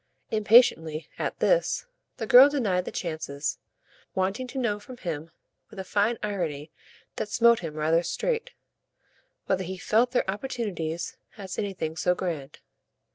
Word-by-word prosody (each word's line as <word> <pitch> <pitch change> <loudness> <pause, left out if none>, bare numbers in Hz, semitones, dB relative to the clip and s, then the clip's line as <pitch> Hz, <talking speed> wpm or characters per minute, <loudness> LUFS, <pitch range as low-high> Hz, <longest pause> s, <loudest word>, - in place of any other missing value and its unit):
Impatiently, 205 - +4
at - - -2
this, - - +2 0.3
the 225 - -3
girl 250 +5 +9
denied 205 -11 0
the - - -5
chances, 155 -4 -3 0.6
wanting 195 +7 -1
to 260 - -8
know 225 -5 0
from 245 +4 -11
him, 165 -6 -5 0.4
with - - -14
a 190 - -4
fine 210 +5 +1
irony 165 -8 -3 0.5
that 210 - -3
smote 235 +1 +5
him 160 -3 -6
rather 160 +2 +2
straight, 465 - -2 1.0
whether 190 0 0
he 185 +1 -5
felt 225 +6 +2
their 250 - 0
opportunities 195 -7 -3 0.2
as 190 -3 -6
anything 185 -6 -3
so 180 +2 +1
grand. 160 -7 -5
190 Hz, 140 wpm, -27 LUFS, 165-235 Hz, 1.0 s, girl